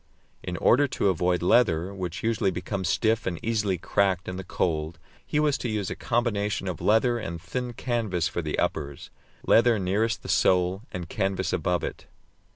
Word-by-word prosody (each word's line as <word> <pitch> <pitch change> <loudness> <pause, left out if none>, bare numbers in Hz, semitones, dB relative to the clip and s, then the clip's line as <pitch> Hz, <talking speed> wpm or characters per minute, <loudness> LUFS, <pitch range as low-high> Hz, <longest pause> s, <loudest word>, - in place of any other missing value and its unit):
In 90 -1 -4
order 140 - +4
to 100 - 0
avoid 90 0 +1
leather, 90 -3 +3
which 95 -1 -5
usually 110 -3 +1
becomes 95 -1 -3
stiff 110 +1 +1
and 85 -3 -2
easily 105 -5 0
cracked 95 +1 0
in 90 - -4
the 95 - -5
cold, 80 -2 -2 0.3
he 150 - -1
was 150 -2 +2
to 120 - -3
use 105 -3 -2
a - - -3
combination 105 -5 -1
of 90 -3 -4
leather 120 +3 +3
and 85 -6 -5
thin 125 +7 -4
canvas 110 -8 -1
for 85 - -3
the 75 -2 -3
uppers 70 -2 -3 0.3
leather 115 0 +5
nearest 105 +4 0
the - - -8
sole, 90 +1 +2
and 90 -1 -5
canvas 95 -2 -1
above 90 -1 0
it. - - -6
95 Hz, 175 wpm, -26 LUFS, 90-115 Hz, 0.3 s, leather